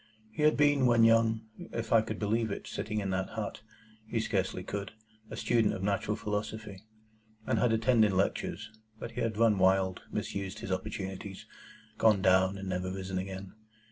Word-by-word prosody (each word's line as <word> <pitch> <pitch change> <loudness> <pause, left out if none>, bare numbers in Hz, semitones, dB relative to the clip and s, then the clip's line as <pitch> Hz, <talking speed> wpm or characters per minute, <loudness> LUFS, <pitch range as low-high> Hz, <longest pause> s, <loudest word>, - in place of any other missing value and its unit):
He 110 - -5
had 155 0 +4
been, 145 -3 +4
when 120 -1 +5
young 115 -1 +4 0.2
(if 115 -1 -4
I 115 - +7
could 110 -1 -5
believe 110 +2 0
it, 100 - -5
sitting 105 - -3
in 100 -2 -2
that 95 0 -1
hut,—he 110 +1 -6
scarcely 95 -4 -1
could), 100 +2 -5 0.4
a - - -7
student 115 -3 +2
of 95 - -5
natural 105 +1 0
philosophy, 105 -1 -4 0.6
and - - +1
had 125 - +3
attended 110 -1 +4
lectures; 100 +3 -1 0.3
but 115 - -7
he 120 +2 -4
had 110 -2 -1
run 110 -3 +4
wild, 95 0 +3
misused 100 +1 -4
his 95 - -6
opportunities, 95 0 -5 0.5
gone 110 -3 +5
down, 95 0 +4
and 95 0 -6
never 95 0 -2
risen 95 0 -3
again. 95 0 -6
105 Hz, 170 wpm, -30 LUFS, 95-115 Hz, 0.6 s, I